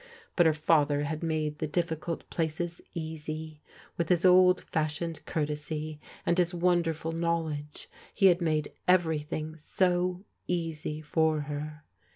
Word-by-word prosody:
Bui 175 - +5
her 160 - +4
father 150 -2 +3
had 155 +1 -3
made 155 -2 -1
the 155 - -1
difficult 165 0 -2
places 165 +1 -2
easy. 155 -1 -5 0.4
With 170 - 0
his 175 0 +3
old 180 0 +6
fashioned 160 +1 -2
coartes>', 150 0 -3 0.3
and 170 - +2
his 175 0 +2
wonderful 170 -2 +1
knowledge, 165 -3 -2 0.2
he 195 - +2
had 180 -1 +6
made 155 -3 0
everything 160 -3 +1
so 180 +3 0 0.2
easy 160 -3 -2
for 155 0 +2
her. 150 +1 -6
160 Hz, 130 wpm, -29 LUFS, 150-170 Hz, 0.4 s, old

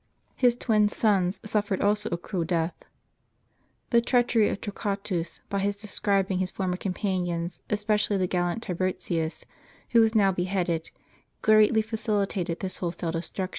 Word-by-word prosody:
His 245 -2 +4
twin 215 -4 +2
sons 195 -4 +1
suffered 205 -2 0
also 210 +1 +1
a 170 - -1
cruel 175 0 -3
death. 165 0 0 1.2
The 235 -1 +5
treachery 235 -3 +3
of - - -3
Torquatus, 200 -4 -3
by 200 - -1
his 200 +1 0
describing 200 -2 0
his 185 -1 0
former 185 -2 -2
companions, 180 -3 -2
espe 210 0 -1
cially 210 -1 +1
the 185 - +1
gallant 180 +4 -1
Tiburtius, 175 -3 -2 0.5
who 235 - +6
was 225 0 +3
now 200 -3 +5
beheaded,* 180 -3 -1 0.5
greatly 215 +1 +5
facilitated 205 -6 -1
this 190 -1 -1
wholesale 170 -1 -3
destruction. 180 +3 -3
195 Hz, 140 wpm, -27 LUFS, 180-210 Hz, 1.2 s, who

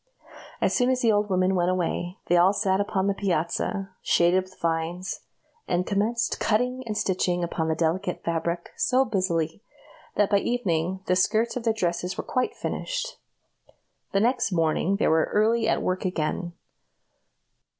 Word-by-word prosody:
As - - +2
soon 250 0 +3
as 255 -1 +1
the 230 - +4
old 205 0 +1
woman 185 0 +2
went 175 -1 +2
away, 180 0 -1
they 175 - +2
all 180 +3 +5
sat 200 -2 +1
upon 195 -1 -1
the 200 - +2
piazza, 190 +1 -1
shaded 180 +2 +3
with 185 0 -19
vines, 165 +3 -2 0.5
and 180 0 0
commenced 225 +5 0
cutting 250 +4 +1
and 210 -1 -2
stitching 180 -4 0
upon 165 -1 -2
the 160 - +1
delicate 175 +3 -1
fabric 170 +1 -2
so 260 +1 +2
busily, 185 -6 -1 0.5
that 205 0 +2
by 200 - +5
evening 190 -6 -1
the 185 - +2
skirts 220 +5 +2
of 245 -2 -4
their 225 - +3
dresses 180 -2 -2
were - - -3
quite 255 - -1
finished. - - -4 0.9
The 195 - +2
next 240 -1 +1
morning 165 +2 +1
they 200 - +1
were 160 0 +3
early 225 +2 +3
at - - +1
work 185 0 -1
again. 175 -1 -2
190 Hz, 160 wpm, -26 LUFS, 175-215 Hz, 0.9 s, all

